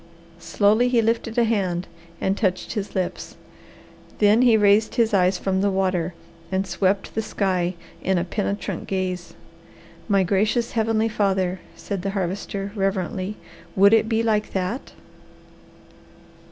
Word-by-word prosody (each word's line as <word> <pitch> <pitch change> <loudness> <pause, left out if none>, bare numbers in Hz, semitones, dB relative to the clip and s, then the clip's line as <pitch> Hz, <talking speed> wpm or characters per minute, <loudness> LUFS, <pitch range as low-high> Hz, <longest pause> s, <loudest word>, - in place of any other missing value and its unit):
Slowly 205 +8 +2
he 245 -2 +3
lifted 230 0 0
a 240 - +5
hand 190 -6 0 0.3
and 190 - 0
touched 190 -3 -1
his 210 -2 -4
lips. 185 -2 -3 0.8
Then 210 +3 +4
he 240 -3 +5
raised 210 +1 +3
his 230 -3 +2
eyes 185 -1 +3
from 190 +1 -1
the 200 - +2
water 185 -3 0 0.4
and 190 +1 0
swept 190 +2 0
the 220 - -1
sky 185 -4 -1 0.3
in 190 0 +1
a 170 - +1
penetrant 200 0 -3
gaze. 185 -2 -3 0.7
"My 200 -3 +3
gracious 210 +6 +1
Heavenly 225 -1 +1
Father," 190 -4 0 0.2
said 200 -3 -5
the 195 - -2
Harvester 195 +2 -3
reverently. 195 0 -2 0.4
"Would 200 +2 +6
it 225 0 +4
be 225 0 +1
like 215 -2 0
that?" 190 +8 -3
200 Hz, 140 wpm, -23 LUFS, 185-220 Hz, 0.8 s, Would